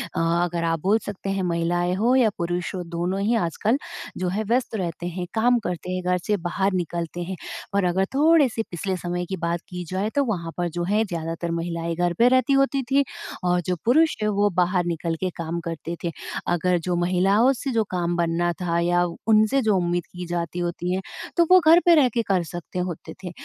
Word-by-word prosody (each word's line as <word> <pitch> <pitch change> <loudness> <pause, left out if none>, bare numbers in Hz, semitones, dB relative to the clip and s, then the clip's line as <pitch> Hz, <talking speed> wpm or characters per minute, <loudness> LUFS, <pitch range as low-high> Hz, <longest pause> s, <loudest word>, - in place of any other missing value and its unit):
अ, - - 0 0.2
अगर 170 -1 -2
आप 165 -1 0
बोल 210 +4 +3
सकते 195 -1 -5
हैं 195 -1 -1
महिलाएँ 175 +1 0
हो 235 +6 +2
या 240 -4 +5
पुरुष 175 +2 -2
हो 180 - -3
दोनों 180 +3 -1
ही 225 +4 +2
आजकल 220 - +1 0.4
जो 185 -1 -1
है 210 +4 -1
व्यस्त 235 +2 0
रहते 175 -3 -3
हैं, 175 +1 -4
काम 240 +2 +3
करते 180 0 -4
हैं। 185 0 -2
घर 180 0 +1
से 210 -1 +2
बाहर 190 +2 0
निकलते 175 -1 -3
हैं 190 +2 -5 0.4
और 200 - +3
अगर 190 +2 +2
थोड़े 310 0 +5
से 225 - -2
पिछले 185 +2 -2
समय 175 0 -3
की 190 - -4
बात 170 0 -1
की 180 -1 -5
जाए 190 +3 -1
तो 285 - +3
वहाँ 170 -8 -3
पर 175 -1 0
जो 175 +1 -3
है 210 +4 +2
ज़्यादातर 165 -1 -4
महिलाएँ 170 0 -2
घर 175 0 +1
पे 235 - +6
रहती 255 +1 +3
होती 275 0 +3
थी 280 +1 +5 0.4
और 180 0 +2
जो 180 - 0
पुरुष 315 +7 +4
है 215 - +1
वो 205 0 +4
बाहर 180 0 +2
निकल 165 -1 -2
के 185 - -1
काम 170 +1 -3
करते 165 +1 -4
थे। 170 - -1 0.4
अगर 175 +1 +2
जो 175 - +1
महिलाओं 190 +8 +3
से 270 +1 -4
जो 225 -2 +2
काम 175 -1 -1
बनना 170 +1 +1
था 170 -1 0
या 175 +1 +2 0.2
उनसे 220 +5 +4
जो 215 -3 +2
उम्मीद 175 0 0
की 180 0 -8
जाती 175 0 -3
होती 175 +1 -2
है, 190 - -1 0.4
तो 340 - +5
वो 370 - +9
घर 335 +2 +8
पे 345 -1 +7
रह 270 -5 +5
के 235 - +2
कर 185 -3 +2
सकते 175 +2 -6
होते 180 -3 -4
थे 180 - -5
180 Hz, 220 wpm, -24 LUFS, 175-215 Hz, 0.4 s, वो